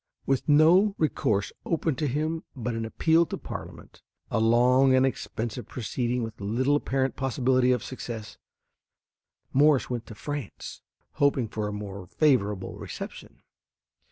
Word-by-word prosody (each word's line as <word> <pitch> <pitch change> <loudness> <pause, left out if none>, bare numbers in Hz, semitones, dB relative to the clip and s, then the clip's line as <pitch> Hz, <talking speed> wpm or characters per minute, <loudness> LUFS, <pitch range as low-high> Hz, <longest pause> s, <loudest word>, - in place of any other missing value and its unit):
With 135 +2 0
no 175 +7 +5
recourse 115 -10 0
open 160 -2 0
to 150 - 0
him 155 +4 -1
but 125 -2 -3
an 115 0 -3
appeal 160 +8 +2
to - - -4
Parliament, - - -9 0.3
a - - +1
long 125 +4 +4
and 130 0 +4
expensive 120 -2 -4
proceeding 120 0 -2
with 110 -2 -7
little 125 +8 +1
apparent 135 -2 0
possibility 130 -1 +2
of 125 -4 +1
success, 115 -4 -7 1.1
Morse 140 -1 +4
went 120 -2 -4
to 110 - -9
France, 145 -1 -6 0.3
hoping 140 -4 +1
for 105 -1 -3
a - - -3
more 100 -3 -7
favorable 105 - +1
reception. - - -8
125 Hz, 135 wpm, -27 LUFS, 110-145 Hz, 1.1 s, no